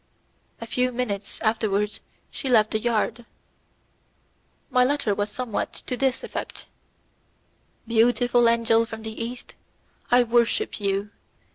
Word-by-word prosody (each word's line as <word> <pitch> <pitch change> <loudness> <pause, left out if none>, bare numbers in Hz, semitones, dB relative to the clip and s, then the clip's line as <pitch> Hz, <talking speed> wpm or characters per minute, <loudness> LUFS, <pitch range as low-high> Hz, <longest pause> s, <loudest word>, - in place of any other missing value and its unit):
A 230 - -6
few 250 +2 0
minutes 210 -5 -3
afterwards 215 -2 0 0.3
she 270 - -4
left 220 -3 +4
the 220 - 0
yard. 235 +1 0 1.5
My 250 -1 +5
letter 270 -5 +1
was 205 +1 -1
somewhat 240 -2 -3
to 250 - -2
this 265 0 0
effect: - - -6 1.2
"Beautiful 240 +1 +4
angel 230 -1 +3
from 225 -1 -8
the 220 +1 -5
East, 245 +1 -7 0.6
I 245 0 +6
worship 240 - +1
you. 200 +1 -1
230 Hz, 120 wpm, -24 LUFS, 215-245 Hz, 1.5 s, I